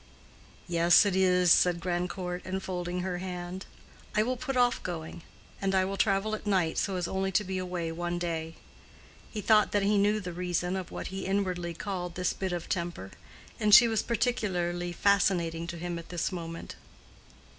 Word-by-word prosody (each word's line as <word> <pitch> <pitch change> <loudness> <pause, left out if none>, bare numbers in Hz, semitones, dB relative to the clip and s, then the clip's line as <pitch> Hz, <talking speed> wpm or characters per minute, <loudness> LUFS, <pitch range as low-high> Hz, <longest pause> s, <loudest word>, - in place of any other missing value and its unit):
"Yes 175 +3 +5
it 200 -2 +1
is," 180 -2 +4
said 175 -1 +5
Grandcourt, 180 +1 -3
enfolding 180 -1 -3
her 180 -1 -3
hand. 180 0 -6 0.5
"I 215 - +4
will 255 +3 -1
put 270 +1 -3
off 245 0 +3
going. 170 -1 -6 0.4
And 195 0 +1
I 190 0 +3
will 195 +1 -3
travel 195 +1 +1
at 215 -1 -5
night, 185 -5 +1
so 195 - -1
as 180 -1 -1
only 190 0 -1
to 210 - +3
be 190 -1 -3
away 180 -2 -3
one 175 +1 -3
day." 165 -2 -3 0.7
He 215 - -5
thought 210 +1 +4
that 205 -1 +2
he 205 +1 +3
knew 210 +2 +3
the 180 -4 -6
reason 180 +1 -1
of 185 -2 -4
what - - -6
he 195 - -4
inwardly 180 -3 -1
called 180 -2 -4
this 180 -1 0
bit 190 -1 -3
of 175 -2 -4
temper, 170 - -3 0.5
and 210 -1 +7
she 235 +1 +9
was 225 -2 +1
particularly 180 -8 -1
fascinating 175 -3 +1
to 170 0 -5
him 175 0 -4
at 170 - -12
this 175 +1 -2
moment. 165 -2 -7
180 Hz, 180 wpm, -29 LUFS, 175-195 Hz, 0.7 s, she